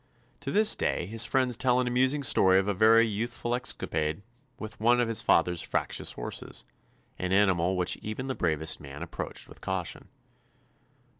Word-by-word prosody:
To 135 Hz, -, -5 dB
this 215 Hz, +4 st, +4 dB
day -, -, -1 dB
his 110 Hz, +4 st, +1 dB
friends 130 Hz, -3 st, +1 dB
tell 125 Hz, -1 st, +2 dB
an 125 Hz, -, +1 dB
amusing 130 Hz, +4 st, +1 dB
story 95 Hz, -6 st, +4 dB
of 95 Hz, +1 st, +1 dB
a 105 Hz, -, +1 dB
very 110 Hz, +3 st, +5 dB
youthful 115 Hz, +2 st, -3 dB
escapade 80 Hz, -9 st, -2 dB, 0.3 s
with 110 Hz, 0 st, -9 dB
one 120 Hz, +3 st, +3 dB
of 120 Hz, -, +2 dB
his 115 Hz, -1 st, 0 dB
father's 85 Hz, 0 st, +2 dB
fractious -, -, -1 dB
horses, -, -, -6 dB, 0.5 s
an 90 Hz, 0 st, -2 dB
animal 95 Hz, -2 st, +2 dB
which 90 Hz, 0 st, 0 dB
even 110 Hz, +4 st, -6 dB
the 135 Hz, -, -2 dB
bravest 80 Hz, -, -1 dB
man 75 Hz, +2 st, -9 dB
ap 85 Hz, -, -10 dB
proached -, -, -6 dB
with -, -, -15 dB
caution. -, -, -4 dB
110 Hz, 170 wpm, -28 LUFS, 90-125 Hz, 0.5 s, very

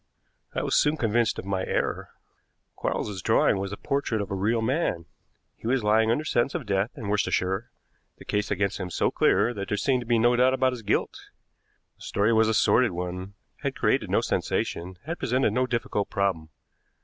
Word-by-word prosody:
I -, -, -1 dB
was -, -, -1 dB
soon 150 Hz, +1 st, +3 dB
convinced 115 Hz, -2 st, +1 dB
of -, -, -6 dB
my 95 Hz, -1 st, -1 dB
error. -, -, -2 dB, 0.7 s
Quarles's 100 Hz, -3 st, -3 dB
drawing 95 Hz, -, +3 dB
was 100 Hz, 0 st, -3 dB
the 100 Hz, -, -6 dB
portrait 140 Hz, -5 st, -1 dB
of 100 Hz, -1 st, -4 dB
a -, -, -1 dB
real 110 Hz, +4 st, 0 dB
man. 125 Hz, -, 0 dB, 0.5 s
He -, -, -8 dB
was 125 Hz, -1 st, +1 dB
lying 110 Hz, +1 st, +3 dB
under 145 Hz, +7 st, +1 dB
sentence 120 Hz, -2 st, +1 dB
of -, -, -3 dB
death 100 Hz, +2 st, 0 dB
in 115 Hz, -6 st, -6 dB
Worcestershire, 100 Hz, 0 st, 0 dB, 0.5 s
the -, -, -14 dB
case 105 Hz, +1 st, -1 dB
against 100 Hz, 0 st, -1 dB
him 90 Hz, -2 st, -4 dB
so -, -, 0 dB
clear 120 Hz, -, +2 dB
that 100 Hz, -3 st, -5 dB
there 105 Hz, -, -1 dB
seemed 130 Hz, +3 st, +1 dB
to 120 Hz, -, -9 dB
be 120 Hz, -1 st, +3 dB
no 120 Hz, +2 st, +4 dB
doubt 130 Hz, +2 st, +4 dB
about 130 Hz, -1 st, +2 dB
his 125 Hz, -, -7 dB
guilt. 105 Hz, -, -2 dB, 0.7 s
The -, -, -27 dB
story 105 Hz, +3 st, +1 dB
was 110 Hz, 0 st, +4 dB
a 110 Hz, -, +1 dB
sordid 110 Hz, +3 st, +3 dB
one, 90 Hz, +2 st, -5 dB, 0.3 s
had -, -, -2 dB
created -, -, +1 dB
no -, -, +2 dB
sensation, 90 Hz, +2 st, -2 dB
had 170 Hz, +3 st, -4 dB
presented 125 Hz, -2 st, +1 dB
no 130 Hz, +2 st, +1 dB
difficult 120 Hz, -4 st, -2 dB
problem. 95 Hz, -6 st, -1 dB
110 Hz, 195 wpm, -26 LUFS, 100-120 Hz, 0.7 s, no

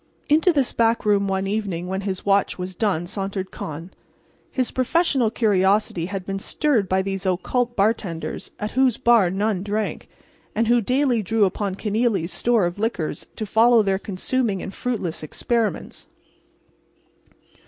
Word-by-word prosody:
Into 315 Hz, +5 st, +5 dB
this 280 Hz, -6 st, 0 dB
back 230 Hz, -1 st, +2 dB
room 200 Hz, -1 st, +3 dB
one 190 Hz, 0 st, -1 dB
evening 195 Hz, -4 st, -2 dB
when 190 Hz, +2 st, -3 dB
his 190 Hz, -2 st, -4 dB
watch 200 Hz, 0 st, +2 dB
was 185 Hz, 0 st, -5 dB
done 180 Hz, -3 st, 0 dB
sauntered 195 Hz, 0 st, -4 dB
Con. 165 Hz, +4 st, -7 dB, 0.6 s
His 255 Hz, -2 st, -1 dB
professional 260 Hz, -2 st, +2 dB
curiosity 200 Hz, -5 st, +1 dB
had 190 Hz, -1 st, -5 dB
been 195 Hz, 0 st, -3 dB
stirred 230 Hz, -, 0 dB
by 190 Hz, 0 st, +2 dB
these 195 Hz, -1 st, -3 dB
occult 235 Hz, +6 st, 0 dB
bartenders 195 Hz, -5 st, -1 dB
at 210 Hz, +1 st, -3 dB
whose 260 Hz, -2 st, +2 dB
bar 230 Hz, -6 st, +4 dB
none 200 Hz, +1 st, 0 dB
drank, 210 Hz, +2 st, -3 dB, 0.5 s
and 225 Hz, +1 st, +1 dB
who 240 Hz, +1 st, +4 dB
daily 255 Hz, +1 st, +1 dB
drew 215 Hz, +1 st, +2 dB
upon 195 Hz, 0 st, -2 dB
Kenealy's 210 Hz, -4 st, 0 dB
store 235 Hz, -5 st, +2 dB
of 175 Hz, +3 st, -3 dB
liquors 205 Hz, -9 st, -2 dB
to 215 Hz, -, -4 dB
follow 225 Hz, +2 st, +5 dB
their 195 Hz, -1 st, 0 dB
consuming 205 Hz, +2 st, -1 dB
and 190 Hz, -, -6 dB
fruitless 210 Hz, -10 st, -3 dB
experiments. 225 Hz, +8 st, -2 dB
205 Hz, 150 wpm, -23 LUFS, 190-235 Hz, 0.6 s, Into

